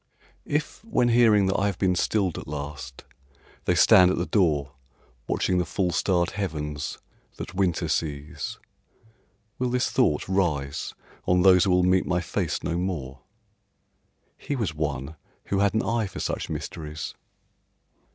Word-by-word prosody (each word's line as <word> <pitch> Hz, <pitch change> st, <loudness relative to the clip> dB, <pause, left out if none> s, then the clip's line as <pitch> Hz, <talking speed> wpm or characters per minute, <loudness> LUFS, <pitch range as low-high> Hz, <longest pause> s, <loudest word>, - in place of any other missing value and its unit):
If, 150 Hz, +6 st, -2 dB
when 125 Hz, -, +1 dB
hearing 115 Hz, -4 st, +5 dB
that 95 Hz, -, +1 dB
I 100 Hz, -, +2 dB
have 100 Hz, -3 st, -2 dB
been 95 Hz, -1 st, +2 dB
stilled 95 Hz, 0 st, 0 dB
at -, -, -10 dB
last, 70 Hz, -2 st, -6 dB, 0.6 s
they -, -, +2 dB
stand 90 Hz, -1 st, +7 dB
at 95 Hz, -, 0 dB
the 85 Hz, -, 0 dB
door, 75 Hz, -10 st, +1 dB, 0.6 s
Watching 90 Hz, -1 st, +1 dB
the -, -, +2 dB
full 90 Hz, -1 st, -1 dB
starred 90 Hz, -1 st, +1 dB
heavens 75 Hz, -7 st, -4 dB, 0.4 s
that -, -, -7 dB
winter 90 Hz, -3 st, 0 dB
sees, 75 Hz, -2 st, -3 dB, 1.0 s
Will 125 Hz, -1 st, 0 dB
this 125 Hz, 0 st, 0 dB
thought 75 Hz, -, +2 dB
rise 80 Hz, -8 st, -1 dB, 0.3 s
on 90 Hz, 0 st, +3 dB
those 90 Hz, -2 st, +6 dB
who -, -, +1 dB
will 90 Hz, 0 st, +4 dB
meet 90 Hz, +1 st, +3 dB
my 90 Hz, -1 st, +1 dB
face 85 Hz, -3 st, -2 dB
no 85 Hz, -, -1 dB
more, 70 Hz, -8 st, -4 dB, 1.2 s
"He 145 Hz, -, -3 dB
was 110 Hz, -, -2 dB
one 75 Hz, -1 st, -3 dB, 0.3 s
who 100 Hz, -, 0 dB
had 100 Hz, +1 st, +2 dB
an 110 Hz, -, +2 dB
eye 115 Hz, 0 st, 0 dB
for -, -, -8 dB
such -, -, -3 dB
mysteries"? 75 Hz, -2 st, -5 dB
90 Hz, 150 wpm, -26 LUFS, 75-100 Hz, 1.2 s, stand